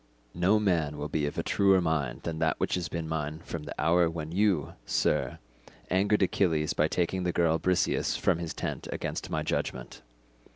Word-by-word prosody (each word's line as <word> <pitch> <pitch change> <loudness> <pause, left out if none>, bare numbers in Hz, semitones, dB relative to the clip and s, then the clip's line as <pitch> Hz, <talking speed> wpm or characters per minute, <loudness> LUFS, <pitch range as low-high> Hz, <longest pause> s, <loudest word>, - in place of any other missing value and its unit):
No 95 +5 +3
man 85 -8 +1
will 75 +1 -4
be 75 -1 0
of 75 - -5
a - - 0
truer 95 -1 +4
mind 80 -7 -1
than 80 -1 -3
that 80 -1 +1
which - - 0
has 90 -2 -1
been 85 -2 -4
mine 75 -1 -3
from 80 -3 -5
the - - -8
hour 85 +2 +3
when 80 -1 -5
you, 95 -5 +1
sir, - - 0 0.5
angered 100 +2 +3
Achilles 80 -5 +1
by 75 - +2
taking 90 +3 -1
the 90 -1 0
girl 80 -1 +2
Briseis 90 0 +1
from 85 - +1
his 85 -2 -4
tent - - -4
against - - -4
my - - -1
judgment. - - -3
85 Hz, 190 wpm, -29 LUFS, 75-90 Hz, 0.5 s, truer